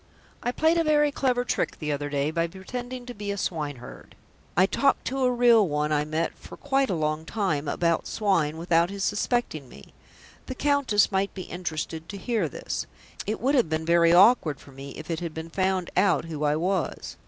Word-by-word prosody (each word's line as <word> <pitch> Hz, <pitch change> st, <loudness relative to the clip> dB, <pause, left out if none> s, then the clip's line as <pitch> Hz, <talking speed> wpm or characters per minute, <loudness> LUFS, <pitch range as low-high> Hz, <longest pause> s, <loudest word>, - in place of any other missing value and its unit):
"I 245 Hz, -, -1 dB
played 320 Hz, +5 st, +2 dB
a -, -, +3 dB
very 295 Hz, -1 st, +3 dB
clever 250 Hz, -3 st, 0 dB
trick -, -, -1 dB
the 150 Hz, -2 st, -3 dB
other 145 Hz, 0 st, -2 dB
day 145 Hz, +1 st, 0 dB
by 165 Hz, +1 st, 0 dB
pretending 245 Hz, +8 st, -7 dB
to 245 Hz, -, -7 dB
be 205 Hz, -2 st, -6 dB
a 200 Hz, -, -2 dB
swineherd. 145 Hz, -9 st, -5 dB, 0.4 s
I 185 Hz, -, +6 dB
talked 275 Hz, +7 st, +1 dB
to 265 Hz, 0 st, -1 dB
a 250 Hz, -, +3 dB
real 235 Hz, -4 st, +5 dB
one 150 Hz, 0 st, -1 dB
I 150 Hz, 0 st, +1 dB
met 155 Hz, +2 st, -1 dB
for -, -, -12 dB
quite 275 Hz, -2 st, +1 dB
a 185 Hz, -, 0 dB
long 155 Hz, 0 st, -1 dB
time 160 Hz, -6 st, -1 dB
about 170 Hz, +3 st, 0 dB
swine 170 Hz, -8 st, 0 dB
without 170 Hz, 0 st, +2 dB
his 200 Hz, 0 st, -4 dB
suspecting 205 Hz, -, -1 dB
me. 70 Hz, -, -15 dB, 0.5 s
The 260 Hz, -, -5 dB
Countess 275 Hz, -9 st, +2 dB
might 195 Hz, +1 st, 0 dB
be 185 Hz, -, -5 dB
interested 165 Hz, -2 st, -5 dB
to 200 Hz, -, -6 dB
hear 210 Hz, -, -1 dB
this. -, -, -5 dB, 0.4 s
It 215 Hz, -, -2 dB
would 265 Hz, +4 st, +2 dB
have 245 Hz, -, +3 dB
been 160 Hz, 0 st, -1 dB
very 170 Hz, 0 st, +4 dB
awkward 175 Hz, -, +5 dB
for 140 Hz, -, -15 dB
me 135 Hz, +1 st, -9 dB
if 155 Hz, +2 st, -7 dB
it 160 Hz, -, -2 dB
had 170 Hz, -2 st, -5 dB
been 160 Hz, +1 st, -6 dB
found 185 Hz, -1 st, 0 dB
out 185 Hz, -2 st, +3 dB
who 155 Hz, -2 st, -3 dB
I 145 Hz, 0 st, +2 dB
was. 180 Hz, +2 st, -2 dB
180 Hz, 205 wpm, -26 LUFS, 155-240 Hz, 0.5 s, I